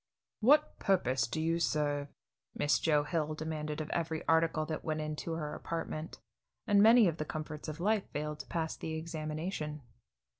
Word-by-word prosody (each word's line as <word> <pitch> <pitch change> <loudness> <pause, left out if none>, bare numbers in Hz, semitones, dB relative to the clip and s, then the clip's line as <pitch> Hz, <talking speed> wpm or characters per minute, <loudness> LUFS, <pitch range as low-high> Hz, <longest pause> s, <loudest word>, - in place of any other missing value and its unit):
"What 295 +7 +4
purpose 130 -11 +2
do 155 - -3
you 165 +1 +1
serve?" 145 -3 0 0.5
Miss 145 - +2
Joe 150 -3 +3
Hill 155 0 -1
demanded 155 -1 -4
of 155 - -5
every 160 -2 -2
article 160 -1 +3
that 155 0 -4
went 155 -1 -1
into 155 +2 -3
her 155 -2 -3
apartment, 165 -1 -5 0.5
and 200 -1 +5
many 225 0 +8
of 165 -2 -1
the 155 - -1
comforts 155 0 -6
of 155 +1 -5
life 210 +2 +1
failed 150 0 -4
to - - -8
pass 160 -1 -2
the 160 - -4
examination. 155 -1 -4
155 Hz, 165 wpm, -32 LUFS, 150-165 Hz, 0.5 s, many